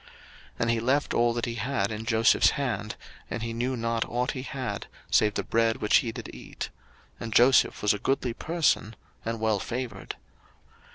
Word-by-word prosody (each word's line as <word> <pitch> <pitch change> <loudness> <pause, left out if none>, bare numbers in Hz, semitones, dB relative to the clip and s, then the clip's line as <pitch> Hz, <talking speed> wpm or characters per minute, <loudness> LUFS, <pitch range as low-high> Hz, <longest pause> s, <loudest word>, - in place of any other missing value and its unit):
01:039:006 - - -19 0.5
And 115 - +2
he 115 - +1
left 130 +6 +1
all 120 0 +3
that 120 0 -1
he 120 - -3
had 115 -3 -1
in 110 +1 -5
Joseph's 115 +1 +5
hand; 105 -7 -2 0.3
and 115 - -4
he 115 0 -3
knew 125 +2 -1
not 115 0 0
ought 125 +2 0
he 130 - -5
had, 130 -1 -4 0.2
save 105 -1 +4
the - - -1
bread 115 0 +2
which 105 - +4
he 115 - 0
did 115 0 -8
eat. - - -7 0.5
And 115 - -5
Joseph 125 +1 +5
was 105 - +4
a 105 - -4
goodly 130 0 0
person, 155 -8 0 0.3
and 115 0 -3
well 110 -2 +1
favoured. 120 +2 -5
115 Hz, 185 wpm, -27 LUFS, 110-125 Hz, 0.5 s, Joseph's